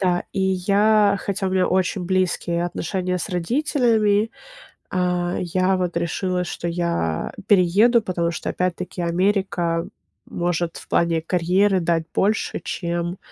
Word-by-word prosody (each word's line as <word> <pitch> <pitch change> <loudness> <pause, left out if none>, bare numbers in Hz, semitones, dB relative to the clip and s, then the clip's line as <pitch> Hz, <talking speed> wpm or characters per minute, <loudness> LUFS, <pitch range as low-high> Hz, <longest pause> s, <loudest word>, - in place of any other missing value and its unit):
Да, 180 -2 +1
и - - -2
я, 200 +2 +3
хотя 200 0 -3
у - - -1
меня 185 -1 +2
очень 185 0 0
близкие 175 -2 0
отношения 180 +1 -2
с - - -4
родителями, 225 - +1 0.6
а, 180 -1 0
я 185 +2 +1
вот 180 -2 -1
решила, 180 +2 -1
что 175 - -5
я 170 - -1 0.2
перееду, 205 +5 +4
потому 170 -3 -1
что, - - -4
опять-таки, 180 0 -3
Америка 175 -1 0 0.4
может 175 -1 -2
в - - -12
плане 170 -1 +2
карьеры 185 +3 +2
дать 165 -1 0
больше, 215 +3 0
чем, 175 0 -3
180 Hz, 130 wpm, -22 LUFS, 170-195 Hz, 0.6 s, перееду